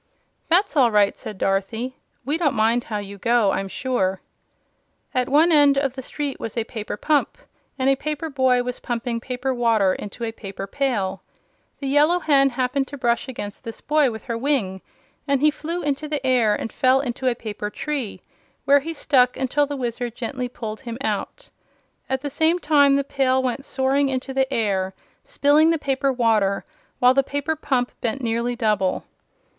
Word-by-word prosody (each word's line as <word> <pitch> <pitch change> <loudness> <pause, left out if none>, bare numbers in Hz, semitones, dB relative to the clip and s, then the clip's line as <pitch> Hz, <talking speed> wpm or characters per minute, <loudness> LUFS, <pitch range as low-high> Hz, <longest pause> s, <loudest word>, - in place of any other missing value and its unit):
"That's 370 +4 +3
all 260 -5 +5
right," 205 -2 +3
said 210 - -8
Dorothy. 220 +7 -1 0.3
"We 290 +3 0
don't 320 -6 +1
mind 225 +2 +2
how 215 - -3
you 200 -1 -7
go, 230 -2 +3
I'm 195 - -2
sure." 195 -4 -1 0.9
At 255 0 0
one 310 +5 +5
side 290 -3 +5
of 275 -2 +1
the 265 - -6
street 285 +1 -4
was 225 +1 -6
a 230 - +1
paper 215 -2 -6
pump, 295 +2 +1 0.4
and 260 -1 0
a 270 - +5
paper 305 +3 -3
boy 260 -4 +2
was 250 0 -5
pumping 235 -1 -3
paper 250 +2 -3
water 225 -6 +2
into 210 +5 -7
a 225 - -2
paper 195 -3 -7
pail. 200 -6 -1 0.6
The 275 - -4
Yellow 295 +5 +4
Hen 280 -5 +4
happened 260 +2 -1
to 285 - -8
brush 240 -1 0
against 205 -6 -7
this 230 - -7
boy 300 -2 +2
with 220 -2 -7
her 235 - -3
wing, 230 -9 0 0.5
and 280 -1 +2
he 300 +2 +4
flew 335 +4 -4
into 290 +1 -2
the 295 -3 -3
air 240 -5 +3
and 225 - -5
fell 260 +1 +3
into 260 -1 -3
a 245 - +2
paper 210 -2 -5
tree, 275 -1 -4 0.4
where 285 +1 +6
he 325 +4 -6
stuck 255 -4 +3
until 275 +2 +1
the 285 0 -4
Wizard 240 -1 -3
gently 250 +1 -4
pulled 220 -3 -6
him 235 -3 -6
out. - - -3 0.6
At 265 0 -1
the 285 - -4
same 320 +4 +2
time, 290 -4 +4
the 280 - +1
pail 260 -1 +1
went 260 +2 -3
into 270 0 +1
the 265 0 +1
air, 195 -5 0 0.3
spilling 295 +3 +3
the 330 - +2
paper 275 -1 0
water, 220 -6 +1 0.3
while 250 +1 +5
the 275 - +4
paper 285 +3 -2
pump 255 -5 -1
bent 235 +3 -1
nearly 235 +1 -1
double. 210 -5 0
255 Hz, 185 wpm, -23 LUFS, 230-280 Hz, 0.9 s, where